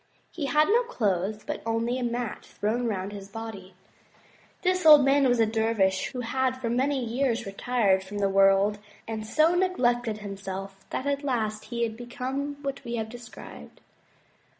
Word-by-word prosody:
He 295 -5 -3
had 300 +2 +4
no 460 +4 +4
clothes 210 - -1
but - - -4
only 230 +2 -1
a - - -2
mat 240 -1 -3
thrown 235 +4 -2
round 195 -2 -3
his 200 -1 -9
body. 200 -4 -8 0.9
This 370 0 +1
old 300 -3 +9
man 275 0 +4
was 245 -1 +2
a 225 - +5
dervish 220 -4 +1
who 255 -2 -5
had 260 +2 0
for 235 -3 -2
many 260 +1 +1
years 235 0 0
retired 200 -1 +1
from 200 +2 -7
the 200 -1 +2
world, 195 +1 +4 0.3
and 220 -1 -4
so 315 +7 +3
neglected 245 - +1
himself 195 -1 -7
that 260 - -3
at 280 0 -1
last 220 -6 -1
he 235 +1 -2
had 225 -1 -2
become 260 +4 -4
what 275 0 -4
we 235 -1 -4
have 220 -1 -3
described. 240 0 -11
230 Hz, 170 wpm, -27 LUFS, 205-265 Hz, 0.9 s, old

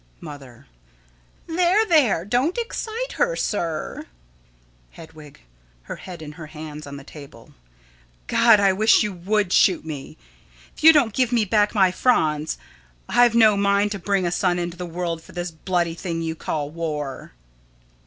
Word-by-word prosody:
Mother: 135 - -11 0.8
There, 360 +6 +2
there, 270 - +3
don't 250 - 0
excite 465 +1 -4
her, - - +1
sir. 165 - -3 0.9
Hedwig: 155 -3 -14 0.4
[Her - - -7
head 175 -4 -10
in 150 - -8
her 155 +1 -10
hands, 150 -1 -9
on 140 0 -8
the 140 - -11
table.] 140 -1 -14 0.7
God! 230 - +5
I 195 -1 +3
wish 215 +4 +4
you 210 -2 -3
would 195 +2 -1
shoot 180 -4 +3
me! 145 -4 -8 0.6
If - - -13
you 320 - +10
don't 275 -9 +2
give 255 0 +1
me 235 -3 +2
back 210 +2 +1
my 190 -3 +4
Franz! 155 -9 +1 0.5
I've 240 -1 +4
no 220 -3 +6
mind 200 +1 +1
to 200 - -4
bring 195 0 0
a 175 - -1
son 180 0 +1
into 175 -1 -4
the 180 0 -6
world 170 -1 -4
for - - -16
this 175 -1 -4
bloody 170 +1 -1
thing 165 -1 -4
you 160 0 -2
call 150 -2 -4
war. 150 - -5
180 Hz, 160 wpm, -22 LUFS, 160-220 Hz, 0.9 s, you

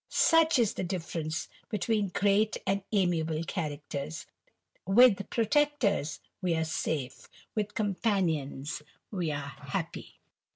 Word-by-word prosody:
Such 325 -2 +5
is 230 -5 +3
the - - -3
difference 165 -3 -3 0.2
between 210 -1 0
great 200 +3 +2
and 195 +1 +1
amiable 165 -5 +1
dhaucteis; 145 - -4 0.6
with 200 -1 +6
protectors 230 - +1 0.2
we 180 -3 +1
are 160 - +1
safe, 155 -4 -3 0.2
with 210 -2 -2
companions 175 - 0 0.3
E 180 -4 -1
happy. 145 -2 -4
185 Hz, 100 wpm, -30 LUFS, 160-210 Hz, 0.6 s, with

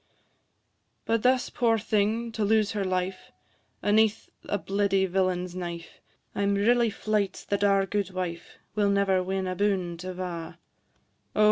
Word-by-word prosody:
But 230 -1 +1
thus, 255 +1 +2
poor 230 -2 +2
thing, 220 +2 0
to 220 -1 -2
lose 215 0 +3
her 205 -2 -1
life, 185 0 -2 0.5
Aneath 215 +1 +2 0.2
a 205 - +1
bleedy 195 0 +1
villain's 180 -1 0
knife, 170 -2 -6 0.3
I - - -2
'm 200 0 +2
really 235 +3 +3
fleyt 210 -2 -1
that 200 0 0
our 195 -1 +4
guidwife 185 -4 -3 0.2
Will 205 -1 +2
never 200 -2 +2
win 190 +1 -2
aboon 185 -2 -1
't 180 - -7
ava: 180 -3 -5 0.8
O! - - -2
200 Hz, 140 wpm, -27 LUFS, 185-210 Hz, 0.8 s, our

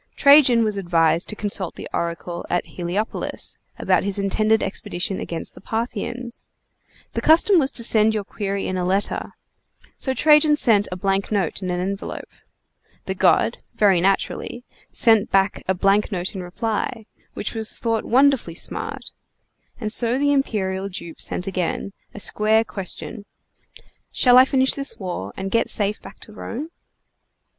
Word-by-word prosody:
Trajan 280 -5 +6
was 210 -2 0
advised 170 -2 +1
to 215 - -3
consult 200 -4 -2
the - - -8
oracle 170 +1 -3
at 175 - 0
Heliopolis, 180 +5 -4 0.2
about - - +1
his 200 0 -2
intended 215 +2 +1
expedition 190 -1 -3
against 165 - -4
the - - -14
Parthians. 235 +2 -5 0.7
The - - -2
custom 340 +4 +5
was 270 -3 +2
to 235 - -1
send 220 -1 +3
your 210 - -1
query 200 0 -4
in 185 - -2
a 180 - -1
letter; 190 +3 -1 0.6
so 265 -1 -1
Trajan 300 0 +5
sent 220 -8 +3
a - - -3
blank 195 +2 -1
note 195 -3 -1
in 185 - -3
an 180 0 -1
envelope. 195 +2 -5 0.7
The - - -2
god - - +2 0.2
(very 195 -5 +4
naturally) 195 +5 -1 0.3
sent 225 -3 +3
back 195 0 +1
a 190 - +1
blank 195 +4 +2
note 180 -2 -2
in 190 - -5
reply, 220 +5 -3 0.3
which - - -4
was 220 -1 -5
thought 225 -2 -1
wonderfully 260 -8 +2
smart; - - -4 0.7
and 215 -2 -2
so 240 +2 +3
the 285 +1 +2
imperial 195 -8 -1
dupe 170 -3 -7
sent 180 - -1
again, 190 +1 -3 0.2
a - - -7
square 215 +2 +2
question: 205 +1 -6 0.9
"Shall 250 -1 +6
I 260 - +7
finish 265 -1 +2
this 275 0 0
war 175 - -5
and 195 0 -4
get 230 - +1
safe 205 0 +1
back - - -13
to 215 - -11
Rome?" 260 +8 -6
205 Hz, 155 wpm, -22 LUFS, 190-235 Hz, 0.9 s, I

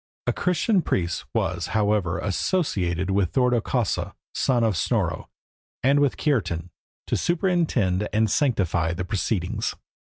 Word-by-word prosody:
A - - +1
Christian 180 +3 +1
priest 85 - -1
was, 85 0 -1
however, 105 -5 +1
associated 95 - 0
with 95 -2 +1
Thordo 125 -3 +3
Kausa, 120 -3 -1 0.2
son 125 -3 +1
of 110 -4 +2
Snorro, 80 - -1 0.5
and 140 +3 +4
with 145 -2 +2
Kiartan, 90 - -1 0.3
to - - -1
superintend 160 - +1
and 110 +1 +2
sanctify 95 - +1
the 90 - -3
proceedings. 95 -1 -1
105 Hz, 125 wpm, -24 LUFS, 90-135 Hz, 0.5 s, and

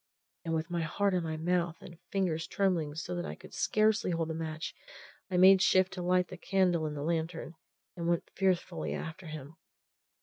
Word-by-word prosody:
And 165 -2 -1
with 160 +2 -2
my 170 -1 0
heart 195 +5 +1
in 180 - +2
my 160 -1 -3
mouth 175 +1 0
and 175 -4 -12
fingers 175 -5 0
trembling 170 -7 0
so 170 +2 -4
that 175 0 -2
I - - -5
could - - -14
scarcely 215 0 +2
hold 165 -2 -1
the - - -2
match, 160 0 -4 0.6
I 180 - 0
made 190 +1 +8
shift 185 0 +4
to 185 - -5
light 180 0 +2
the 185 - -8
candle 180 -4 +2
in 150 - -4
the 145 - -4
lantern, 165 +1 -2 0.4
and 170 -2 -3
went 170 -1 0
fearfully 170 - 0
after 165 - -6
him. 155 0 -8
170 Hz, 195 wpm, -31 LUFS, 160-185 Hz, 0.6 s, made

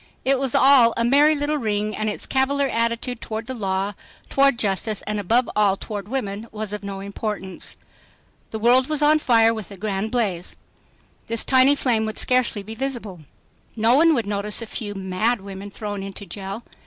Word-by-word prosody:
It 270 0 +3
was 270 -3 -1
all 260 -4 +6
a 230 - +1
merry 290 +5 +4
little 295 +1 -1
ring 210 -2 -2
and 215 0 -1
its 210 - -2
cavalier 275 +1 +1
attitude 230 +1 -2
toward 220 +1 -5
the 260 - -4
law, 195 -3 -2 0.4
toward 275 -2 +4
justice, 210 0 0
and 210 0 -3
above 230 +5 +2
all 200 -2 +3
toward 205 -2 -6
women 215 -3 -4
was 215 -1 -5
of 210 -1 -5
no 195 -1 -6
importance. 200 -1 -6 0.7
The 220 - -4
world 245 +4 +4
was 305 -1 +1
on 305 +1 +5
fire 230 -5 +4
with 215 -5 -7
a 200 - -10
grand 205 +1 -2
blaze. 200 -8 -2 0.7
This 230 0 +2
tiny 265 +2 +5
flame 230 -6 0
would 220 - -5
scarcely 250 -5 +2
be 220 +3 -7
visible. 225 -7 -4 0.6
No 225 +1 +3
one 320 +3 +5
would 235 -5 -1
notice 205 0 0
a 230 - -3
few 210 -2 -5
"mad" 195 +5 -1
women 195 0 -8
thrown 205 -1 -5
into 195 +1 -7
jail. 195 +3 -6
220 Hz, 185 wpm, -22 LUFS, 200-255 Hz, 0.7 s, all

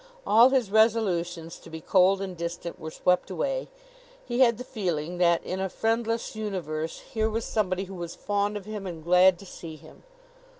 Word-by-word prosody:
All 230 +4 +7
his 255 -7 +1
resolutions 180 -7 +1
to - - -14
be 160 - -7
cold 190 +3 +3
and 190 -2 -5
distant 170 0 -5
were 160 - -6
swept 180 +3 +1
away. - - -2 0.6
He 240 0 -2
had 235 -4 +5
the 250 - -6
feeling 175 -7 -3
that 170 -1 +3
in 185 - -4
a 190 0 -1
friendless 225 +2 -1
universe 170 -7 -4
here 220 -1 +1
was 225 +1 -2
somebody 190 -3 0
who 195 0 -9
was 175 -2 -6
fond 205 0 -1
of 200 - -9
him 210 -2 -6
and 165 -3 -7
glad 180 +2 +5
to 195 - -13
see 165 -3 -9
him. - - -16
190 Hz, 185 wpm, -27 LUFS, 170-220 Hz, 0.6 s, All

